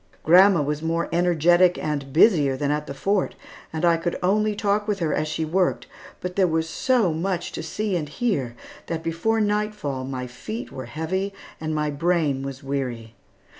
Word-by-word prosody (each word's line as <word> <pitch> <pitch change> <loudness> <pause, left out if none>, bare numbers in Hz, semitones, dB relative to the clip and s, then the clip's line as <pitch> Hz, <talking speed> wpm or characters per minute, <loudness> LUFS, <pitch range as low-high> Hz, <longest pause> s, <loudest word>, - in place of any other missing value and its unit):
Grandma 180 0 +6
was 150 +1 -2
more 165 +1 -1
energetic 175 +1 +4
and 140 -3 -3
busier 150 - +4
than 145 +1 0
at 150 0 -2
the - - -5
Fort, 195 +5 0 0.4
and 160 +2 -1
I 170 -1 +4
could 170 +1 -2
only 210 +3 +2
talk 205 +1 0
with 210 -2 0
her 165 -5 -1
as 155 - 0
she 160 +1 -2
worked, 180 +3 0 0.4
but 180 0 -4
there 190 -2 +4
was 160 -1 0
so 225 -2 +1
much 175 +2 -2
to - - -5
see 195 +5 -2
and 155 -4 -2
hear 145 - -1 0.3
that 165 -1 -3
before 170 +8 0
nightfall 210 -10 -1
my 130 -1 -4
feet 215 - -7
were 130 -2 -7
heavy 185 +9 -3 0.2
and 155 0 -3
my 150 -1 0
brain 150 -3 +1
was 135 0 -6
weary. 125 -5 -4
165 Hz, 180 wpm, -24 LUFS, 145-190 Hz, 0.4 s, Grandma